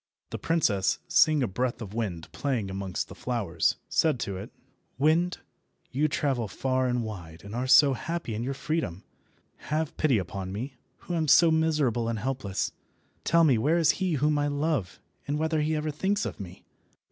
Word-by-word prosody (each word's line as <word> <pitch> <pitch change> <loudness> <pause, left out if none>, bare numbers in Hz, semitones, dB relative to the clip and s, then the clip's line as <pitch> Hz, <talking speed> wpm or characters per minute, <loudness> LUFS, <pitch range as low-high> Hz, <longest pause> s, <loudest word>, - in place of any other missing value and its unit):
The - - -4
princess, 110 - +1
seeing 155 -3 +4
a - - +1
breath 120 +6 -2
of 105 -4 -7
wind 100 -8 -3
playing 120 -9 -2
amongst 95 -1 -3
the - - -10
flowers, 100 -10 0
said 155 -6 +2
to 100 - -3
it— 95 - -7 0.5
"Wind, 160 +6 +2 0.5
you 145 +4 +2
travel 135 -6 0
far 130 +4 0
and 120 -1 0
wide 85 -7 -8
and 100 +1 -9
are 125 +2 -2
so 140 +1 +7
happy 165 -2 -4
in 105 - -3
your 135 +3 -2
freedom, 155 - -2 0.7
have 155 0 -1
pity 140 -7 +3
upon 95 0 -4
me, 120 +8 -5 0.3
who 175 - -5
am 160 -2 0
so 165 +4 +6
miserable 150 -8 +1
and 115 - -1
helpless. 120 -5 -2 0.5
Tell 170 +1 +4
me 135 -8 +4
where 155 +8 +2
is 165 -3 +5
he 185 -3 +1
whom 150 +1 +2
I 145 - +1
love, 145 - -1 0.3
and 145 +1 0
whether 160 0 0
he 155 +1 0
ever 155 0 -1
thinks 195 +7 0
of - - -5
me." 95 -1 -9
130 Hz, 180 wpm, -27 LUFS, 105-155 Hz, 0.7 s, so